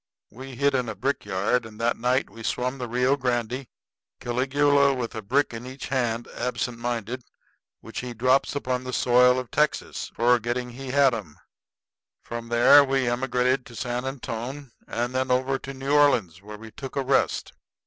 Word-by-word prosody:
We 130 +3 -9
hid 140 +2 +2
in 125 -3 0
a - - -5
brickyard; 125 -3 0
and 110 -1 -12
that 115 +1 +1
night 125 +3 +1
we 115 - -13
swum 125 +3 -2
the 125 - -3
Rio 125 +3 +2
Grande, 125 -1 -2 0.5
Caligula 140 +3 +2
with 120 -3 -4
a 110 - -5
brick 130 +7 +1
in 115 +2 -7
each 130 +2 -7
hand, 120 -3 -1
absent 125 -1 -3
minded, 120 +1 -3 0.6
which - - -7
he 125 -1 -6
drops 130 +5 +2
upon 130 -2 -2
the 130 0 -6
soil 125 +1 +4
of 125 -2 -5
Texas, 150 0 -1
forgetting 120 +1 +1
he 130 +2 -8
had 135 -1 +4
'em. 95 -10 -6 0.9
From 120 0 -6
there 120 +5 +7
we 135 -2 0
emigrated 125 +1 +1
to 120 - -12
San 125 +1 -3
Antone, 130 +1 -5 0.2
and 120 +2 -2
then 130 0 0
over 130 +1 +1
to 135 - -7
New 135 +1 -4
Orleans, 115 - +3
where 105 +1 -9
we 110 +1 -11
took 135 +3 -8
a 140 - 0
rest. 135 +1 +1
125 Hz, 175 wpm, -25 LUFS, 120-135 Hz, 0.9 s, there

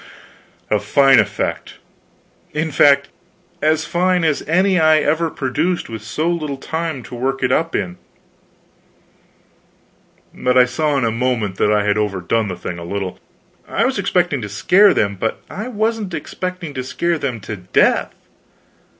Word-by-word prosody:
A 105 - +3
fine 135 +5 +5
effect. - - -2 0.8
In 155 +1 -1
fact, 140 0 +4 0.5
as 155 +1 +2
fine 180 +2 +1
as 155 -3 +1
any 185 +3 +3
I 155 -1 +5
ever 160 +2 +1
produced, 155 +6 -2
with 110 -2 -6
so 130 +10 -3
little 155 -5 -2
time 160 -2 -4
to - - -12
work 135 +2 -2
it 130 - +2
up 165 +4 +1
in. 90 -1 -2 2.4
But 125 0 +1
I 125 - +7
saw 145 +3 0
in 130 - +1
a 115 - +1
moment 115 -5 -1
that 105 - +2
I 105 -1 +2
had 105 +1 +1
overdone 105 +1 -1
the 90 - -4
thing 90 -1 -6
a - - -7
little. 95 +1 -4 0.5
I - - 0
was - - 0
expecting - - +1
to 105 - -5
scare 190 - +4
them, 100 -1 0
but 110 - -2
I 215 +4 -5
wasn't 220 -5 -2
expecting 180 -4 -5
to 130 -2 -4
scare 170 +5 -1
them 130 -5 -3
to 105 +1 -6
death. 90 0 +2
140 Hz, 160 wpm, -19 LUFS, 110-165 Hz, 2.4 s, I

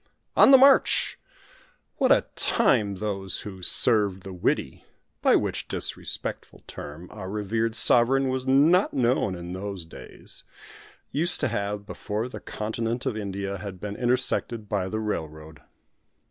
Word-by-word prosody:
On - - +7
the 270 - +9
march! 275 +1 +4 0.8
What - - +2
a - - +4
time 110 - +2
those 95 -2 -3
who 95 -2 -9
"served 100 -1 +4
the 95 - -8
Widdy" 90 - -2 0.4
by - - +4
which - - -2
disrespectful - - -4
term, 75 +5 -9
our 105 -3 -8
revered 110 +2 -2
Sovereign 130 +4 +3
was 130 0 -3
not 155 +9 +3
known 120 -6 +1
in 85 0 -7
those 95 -2 -6
days 80 - -10 0.7
used 170 +5 +5
to 145 - +1
have 100 -2 -3
before 110 +2 -4
the 125 - -9
continent 115 +3 -4
of 130 -5 -1
India 100 -2 -4
had 95 -2 -8
been 105 +1 -6
intersected 120 -2 -1
by 100 -3 -2
the 110 - -3
railroad! 80 -7 -6
105 Hz, 140 wpm, -25 LUFS, 95-125 Hz, 0.8 s, the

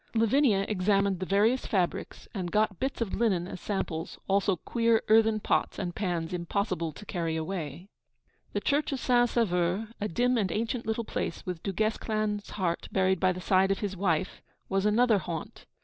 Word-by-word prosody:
Lavinia 225 -3 +3
examined 200 -1 +1
the 185 - -3
various 215 +6 +2
fabrics, 185 -6 -2
and 185 -4 -3
got 210 -3 +1
bits 265 -2 -2
of 220 -5 -1
linen 195 -6 +1
as 185 - -8
samples, 170 -5 -3
also 195 0 +2
queer 230 +5 +1
earthen 220 0 +5
pots - - 0
and 180 -3 -3
pans 175 -4 -2
impossible 175 -1 -1
to 210 - -12
carry 165 -4 -2
away. 160 0 -4 0.7
The - - -1
church 295 +1 +1
of 275 - -2
St. 245 -1 +3
Sauveur, 190 -2 +1
a 210 - 0
dim 245 +6 +1
and 190 -4 0
ancient 230 +3 -2
little 220 +1 -1
place - - -4
with 180 -3 -4
Du 195 - -2
Guesclin's 215 0 -1
heart 180 -4 -2
buried 190 -1 +2
by 185 -1 +3
the 180 - -5
side 190 +1 +3
of 195 - +1
his 200 -2 -2
wife, 185 -1 -1 0.3
was 195 +1 +1
another 220 0 +4
haunt. 165 -2 -6
195 Hz, 180 wpm, -29 LUFS, 180-220 Hz, 0.7 s, earthen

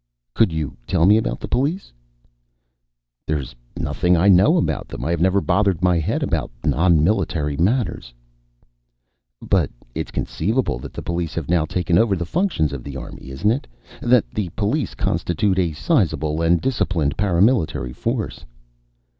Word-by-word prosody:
"Could 110 -6 +3
you 80 -3 -4
tell 85 -3 +2
me 105 +3 +6
about - - -1
the - - -6
police?" 150 +10 -1 1.3
"There 75 - +1
is 70 -2 -7 0.2
nothing 90 0 +1
I 95 +5 +4
know 100 - +5
about 165 - -1
them. - - -7
I 80 - 0
have 85 -1 -1
never 95 +2 +3
bothered 95 -1 +1
my 90 -2 +3
head 80 - -1
about - - -1 0.2
non 80 -2 +3
military 80 -6 0
matters." 100 - 0 1.3
"But - - +2 0.2
it - - -3
is - - -14
conceivable 110 +10 -1
that - - -9
the - - -7
police 85 -2 -3
have 80 -4 -4
now 85 -3 +2
taken 90 +1 +1
over 110 -4 +3
the 85 -2 -3
functions 85 - 0
of 65 -3 -6
the 70 -2 -7
army, 65 - -9
isn't 70 +11 0
it? 130 +4 -2 0.3
That 120 -1 +3
the 105 -5 -3
police 110 +8 -1
constitute 95 +3 0
a 85 -3 +1
sizable 75 +3 0
and 85 +1 +3
disciplined 85 - 0
paramilitary 95 - +1
force?" - - -3
90 Hz, 165 wpm, -21 LUFS, 80-105 Hz, 1.3 s, me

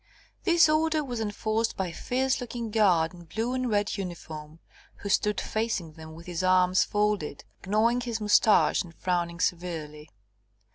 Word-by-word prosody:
This 340 -1 +5
order 310 0 +2
was 245 -4 -5
enforced 220 +1 -1
by 190 -2 -1
a - - -9
fierce 260 +5 -1
looking 235 -2 -5
guard 185 -7 +3
in 175 -1 -13
blue 225 +8 -2
and 255 -1 -1
red 205 -1 0
uniform, 160 -4 -7 0.4
who 200 - -7
stood 210 0 +1
facing 215 -8 -2
them 160 0 -11
with 165 +1 -12
his 175 -1 -3
arms 185 0 +4
folded, 205 -8 -1 0.2
gnawing 230 +4 +2
his 235 -2 -3
moustache 210 0 +4
and 170 -3 -10
frowning 170 -1 -2
severely. 160 -4 -3
205 Hz, 155 wpm, -27 LUFS, 170-230 Hz, 0.4 s, This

